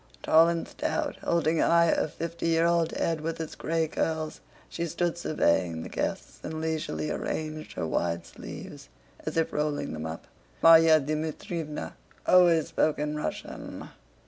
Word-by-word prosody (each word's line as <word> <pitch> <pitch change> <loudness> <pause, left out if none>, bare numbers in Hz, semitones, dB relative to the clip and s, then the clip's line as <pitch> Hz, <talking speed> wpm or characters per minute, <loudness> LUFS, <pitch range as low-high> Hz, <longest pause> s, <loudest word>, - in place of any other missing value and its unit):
Tall 165 +1 +6
and 170 -1 -2
stout, - - -2
holding 165 -1 +1
high 170 -1 +4
her - - +1
fifty 170 +2 -4
year 165 0 +3
old 170 -1 +3
head 165 -2 -1
with 165 +1 -3
its 160 - -5
gray 165 0 -1
curls, 155 0 -2 0.3
she 170 0 -3
stood 175 +1 -1
surveying 85 - +1
the - - -7
guests, - - -3
and 155 0 -5
leisurely 160 -1 -2
arranged 155 0 -4
her - - -3
wide 85 +1 -1
sleeves - - -10 0.4
as - - -2
if 165 - +1
rolling 150 - -1
them 80 0 -4
up. 80 +1 -7 0.4
Márya 160 -2 +7
Dmítrievna 155 +1 -4 0.3
always 170 -3 +5
spoke 155 -2 +1
in 150 0 -2
Russian. 150 - -5
160 Hz, 150 wpm, -28 LUFS, 150-165 Hz, 0.4 s, Márya